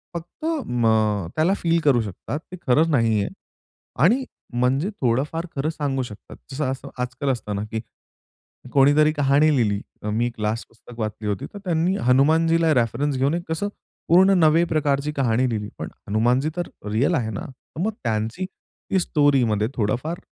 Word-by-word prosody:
फक्त 170 - -7 0.2
मग, 110 -5 +1
त्याला 165 +5 +3
फील 170 0 +1
करू 130 -5 +4
शकतात, 110 - -5
ते 185 - -7
खरं 155 +6 +4
नाहीये 110 -7 +2 0.8
आणि 240 +11 +4 0.3
म्हणजे 130 +8 +1
थोडंफार 140 +7 0
खरं 140 +3 0
सांगू 145 -4 -2
शकतात. 110 -4 -11
जसं 145 +3 -2
असं 130 - -7
आजकाल 130 +3 -2
असत 120 -5 -2
ना, 100 - -2
की 110 - -2 0.9
कोणीतरी 145 +2 +5
कहाणी 145 +1 +3
लिहिली 105 -6 +1 0.3
मी 120 +3 +1
क्लास 110 +2 -2
पुस्तक 115 +1 -15
वाचली 110 -1 -3
होती, 100 -2 -2
तर 205 - -7
त्यांनी 175 +1 +1
हनुमानजीला 160 +5 +4
रेफरन्स 130 +4 0
घेऊन 140 +6 +1
कसं 160 +5 -1 0.4
पूर्ण 190 +4 +6
नवे 160 +1 +5
प्रकारची 150 -2 0
कहाणी 130 -2 +1
लिहिली, 105 -3 -3
पण - - -5 0.2
हनुमानजी 120 +7 +2
तर 175 - -2 0.2
रिअल 125 +11 +2
आहे 120 -7 -1
ना. 100 - -5
तर 135 +4 -10
मग 220 - +1
त्यांची 115 - -1
ती 190 0 -5
स्टोरीमध्ये 130 - +2
थोडंफार 125 +10 -1
135 Hz, 155 wpm, -23 LUFS, 115-160 Hz, 0.9 s, पूर्ण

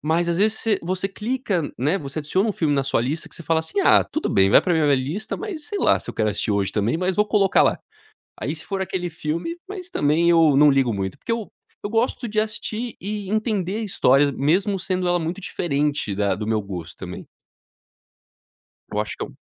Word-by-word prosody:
Mas 165 +3 +1
as 170 - +1
vezes 215 +2 +3
você 220 -3 +2
você 185 +2 -2
clica 210 -4 -2
né, 150 +10 +1
você 140 +2 -5
adiciona 185 +8 0
um - - 0
filme 155 -6 0
na 135 -1 +1
sua 135 - +1
lista 145 +7 -2
que - - -11
você 170 - -8
fala 160 +1 +1
assim: 160 - -2
"Ah - - +5
tudo 310 - -3
bem, 95 0 +4
vai - - +6
para 180 - 0
minha 150 -3 +3
lista 150 +12 -3
mas, 375 -8 -6
sei 415 -2 -3
lá, - - +4
se - - -10
eu - - -5
quero 110 -1 +1
assistir 105 +1 -1
hoje 100 -1 0
também, 110 +7 0
mas 185 +1 -1
vou 210 0 +3
colocar 200 -2 +3
lá". - - +1 0.6
Aí - - -2
se - - -9
for 195 -1 -3
aquele 180 -2 -3
filme, 165 - -3
mas 375 -2 -7
também 165 - +3
ou 160 -4 +5
não 150 0 +7
ligo 135 -4 +2
muito, 95 -1 -4
porque 230 - -3
o 225 -3 -5 0.3
eu - - -3
gosto 230 +2 0
de 215 0 -3
assistir 215 +2 -2
e 205 0 -4
entender 210 -3 -1
a - - -3
histórias 140 -8 +3
mesmo 190 +9 +1
sendo 185 -1 -1
ela 175 0 +2
muito 165 +4 -3
diferente 150 - -1
da 100 0 +1
do 105 0 -5
meu 110 -1 +1
gosto 90 -4 -7
também. 90 -1 -8 1.7
Eu 105 - 0
acho 105 - -4
que - - -3
eu - - -12
170 Hz, 225 wpm, -23 LUFS, 140-210 Hz, 1.7 s, não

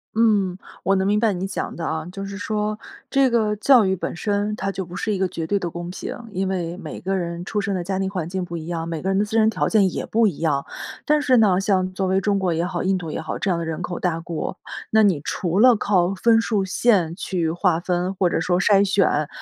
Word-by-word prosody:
嗯， 210 -5 +3 0.3
我 195 - +3
能 190 0 +1
明 210 +1 +2
白 220 -2 +2
你 185 +1 -3
讲 195 - -4
的 165 - -4
啊， 160 -1 -2
就 195 +1 -6
是 195 0 -6
说， 210 0 -2 0.3
这 270 -2 +3
个 215 -3 +2
教 240 +3 +5
育 190 -1 +1
本 175 - -4
身 205 +3 -1
它 195 -1 -2
就 190 -1 -4
不 175 +1 -10
是 215 - -2
一 205 - 0
个 190 0 +1
绝 165 -2 -5
对 205 - +1
的 175 -3 -3
公 175 +1 -6
平， 180 - -6 0.2
因 190 0 -1
为 175 -2 -3
每 165 -5 -8
个 195 +1 -1
人 170 -1 -4
出 210 - -2
生 200 0 -1
的 180 -2 -2
家 190 +2 -2
庭 195 0 -1
环 180 -4 -3
境 185 0 -3
不 170 - -7
一 160 -1 -6
样， 165 -1 -3
每 165 -2 -4
个 190 - -2
人 195 - +1
的 205 - +2
自 210 - -12
身 220 0 +5
条 160 -9 0
件 200 -4 +3
也 - - -4
不 225 0 +3
一 180 - -3
样。 145 -4 0 0.4
但 300 0 +3
是 260 -4 +3
呢， 195 -5 +4
像 190 -2 +1
作 190 0 -1
为 190 +1 +1
中 200 0 +1
国 185 -3 0
也 165 +1 0
好， 180 - -2
印 190 +1 +2
度 175 -3 -4
也 - - -4
好， 160 - -5
这 195 - -1
样 175 - +1
的 165 - -3
人 160 +2 -4
口 175 0 -4
大 170 -3 -1
国， 165 +1 -4 0.4
那 220 - +5
你 195 -8 +3
除 175 +3 -1
了 245 +1 +7
靠 195 -3 +1
分 225 +4 +4
数 215 -3 0
线 190 -4 +2
去 175 -4 -2
划 175 0 +1
分， 180 +1 -1
或 185 -2 +1
者 - - 0
说 175 +1 +1
筛 200 0 +4
选， 190 -6 +2
190 Hz, 285 characters per minute, -22 LUFS, 175-205 Hz, 0.4 s, 了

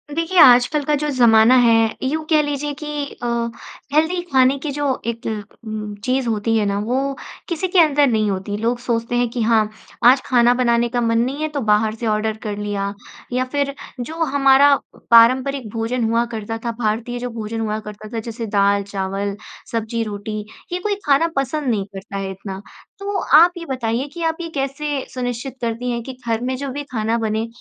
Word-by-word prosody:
देखिए, 335 +3 -1
आजकल 260 +1 +6
का 300 - 0
जो 300 - -1
ज़माना 230 0 +6
है, 240 -2 +5 0.3
यूँ 310 +4 -1
कह 310 -2 +5
लीजिए 290 0 -2
कि 295 0 -4 0.2
अ, - - 0 0.7
हेल्दी 320 +4 +2
खाने 260 +1 +4
की 300 - -4
जो 290 +1 -2 0.2
एक 230 0 -4 0.4
उम, 215 -1 -5
चीज़ 255 0 0
होती 225 0 0
है 215 - +1
ना, 200 0 0
वो 265 +6 -1 0.3
किसी 340 +2 -1
के 360 0 +2
अंदर 295 -3 +5
नहीं 215 -4 +1
होती। 195 +1 -3
लोग 235 +3 -1
सोचते 235 -1 -2
हैं 245 0 +2
कि 240 +1 -3
हाँ, 220 -1 +3 0.3
आज 255 +2 +7
खाना 240 -1 +4
बनाने 240 -1 +2
का 245 0 -1
मन 230 0 +1
नहीं 265 +5 -1
है, 310 - 0
तो 290 -2 -3
बाहर 215 0 +2
से 230 0 -4
ऑर्डर 215 0 0
कर 210 -1 -4
लिया, 205 -1 -3 0.4
या 255 +1 +1
फिर 280 -1 0 0.3
जो 280 +7 -5
हमारा 280 -1 +5 0.4
पारंपरिक 255 +2 +5
भोजन 230 +2 -1
हुआ 230 +1 +2
करता 225 0 -4
था, 235 - 0
भारतीय, 235 +2 -1
जो 245 0 -4
भोजन 225 -1 -5
हुआ 215 -1 -2
करता 210 0 -9
था, 230 - -1
जैसे 230 +1 -5
दाल, 200 0 +3
चावल, 195 0 -3 0.4
सब्ज़ी, 230 0 -2
रोटी, 215 0 -5 0.3
ये 355 - -1
कोई 410 +2 -1
खाना 290 +3 +4
पसंद 275 +2 -1
नहीं 205 -4 0
करता 195 +1 -7
है 195 -1 -3
इतना। 190 0 -7 0.4
तो 400 0 -3 0.2
आप 340 +3 +7
ये 335 - -6
बताइए 255 -1 -2
कि 340 -1 -5
आप 325 0 0
ये 335 - -4
कैसे 275 0 -2
सुनिश्चित 245 0 -4
करती 235 +1 -2
हैं 235 0 -2
कि 265 - -7
घर 225 0 0
में 260 +1 -1
जो 280 +1 -4
भी 290 +2 -4
खाना 225 -1 0
बने, 220 0 -1
240 Hz, 200 wpm, -20 LUFS, 220-275 Hz, 0.7 s, आज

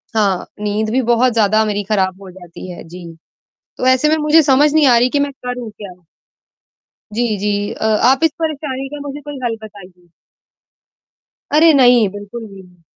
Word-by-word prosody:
हाँ, 200 -4 +1 0.2
नींद 210 +1 -2
भी 260 +3 +1
बहुत 245 +1 +2
ज़्यादा 215 -1 +2
मेरी 205 -1 -2
खराब 190 -2 0
हो 190 - -11
जाती 180 0 -11
है, 175 - -10
जी। 170 0 -11 0.6
तो - - -3
ऐसे 260 +4 +3
में 315 - +2
मुझे 305 +1 +4
समझ 290 +2 +3
नहीं 315 -2 +4
आ 240 - +5
रही 245 +2 +3
कि 285 - 0
मैं 285 0 -1
करूँ 250 -3 -7
क्या? 200 -2 -11 1.2
जी, 225 0 -1
जी, 205 0 -2
अ, - - -6 0.3
आप 270 +4 +2
इस 325 - +4
परेशानी 280 -4 -3
का 295 +1 -8
मुझे 285 +1 -7
कोई 290 -1 -8
हल 230 -2 -1
बताइए। 180 -4 -14 1.4
अरे 320 +2 +5
नहीं! 245 -5 +5
बिल्कुल 205 +4 -9
नहीं। 190 -4 -15
225 Hz, 175 wpm, -17 LUFS, 200-270 Hz, 1.4 s, आ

